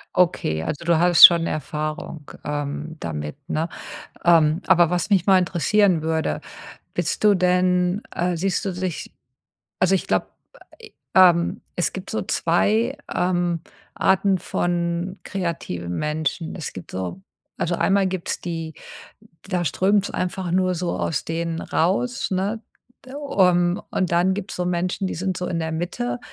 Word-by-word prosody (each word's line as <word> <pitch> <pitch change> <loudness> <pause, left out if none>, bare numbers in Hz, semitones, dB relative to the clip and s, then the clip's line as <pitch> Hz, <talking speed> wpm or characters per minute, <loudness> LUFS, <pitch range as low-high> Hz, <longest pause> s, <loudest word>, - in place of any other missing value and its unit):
Okay, 170 - +1
also 140 - -4
du 170 -1 +3
hast 175 -1 +10
schon 170 -1 +5
Erfahrung, 155 0 -4
ähm, 150 +2 -4
damit, 75 - -5
ne? 160 +2 -1 0.6
Ähm, 165 -1 +4
aber 175 -2 +5
was 180 +3 -1
mich 190 -1 +3
mal 190 -1 +7
interessieren 185 0 +2
würde. 160 0 -1 0.5
Bist - - -2
du 205 -1 +6
denn, 180 +1 +2
äh 175 0 0
siehst 185 +2 -1
du 195 - -1
dich 180 -2 -4 0.7
also 185 +1 +4
ich 190 - -2
glaube, - - 0 0.9
ähm, 175 -2 +5
es 175 - 0
gibt 190 0 -7
so 220 - -1
2, 220 +9 +1 0.2
ähm, 175 -2 0 0.3
Arten 190 0 +2
von 175 +2 -2
kreativen 120 - -4
Menschen. 155 +2 -2
Es 165 - -6
gibt 95 - -10
so 95 - -5 0.4
also 175 +1 -1
einmal 195 +2 +2
gibt's 185 -2 -3
die 165 -2 -5 0.8
da 180 -2 0
strömt's 200 +6 +2
einfach 180 -1 -3
nur 185 0 +2
so 175 0 -2
aus 150 -2 -2
denen 165 0 -3
raus, 205 +9 0
ne? 200 +4 -1 0.5
Ähm, 185 -10 +1
und 185 -3 0
dann 175 +2 +3
gibt's 205 +1 -5
so 180 - -2
Menschen, 180 +2 -1
die - - -4
sind 185 +1 -2
so 180 - -3
in 170 - -2
der 160 0 -3
Mitte, 120 -8 -3
175 Hz, 145 wpm, -22 LUFS, 160-185 Hz, 0.9 s, hast